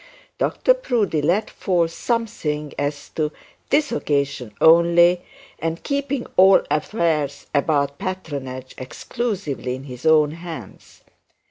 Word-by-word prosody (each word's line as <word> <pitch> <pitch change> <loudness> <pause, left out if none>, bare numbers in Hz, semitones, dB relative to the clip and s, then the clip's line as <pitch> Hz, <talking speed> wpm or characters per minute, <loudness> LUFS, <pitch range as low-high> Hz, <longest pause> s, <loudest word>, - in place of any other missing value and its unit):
Dr - - +3
Proudie 230 - 0
let 180 +8 +1
fall 175 -4 0
something 165 - -2
as 145 0 -3
to 155 -1 -2 0.4
'this 290 -1 +2
occasion 140 - -1
only,' 170 +2 +6 0.4
and 165 +1 -3
'keeping 280 -2 -2
all 190 +1 +7
affairs 155 -4 0
about 140 -1 +1
patronage 140 -8 -5
exclusively 155 - -3
in 130 - -9
his 125 -3 -10
own 155 -2 +5
hands.' 165 - -10
160 Hz, 110 wpm, -22 LUFS, 145-195 Hz, 0.4 s, all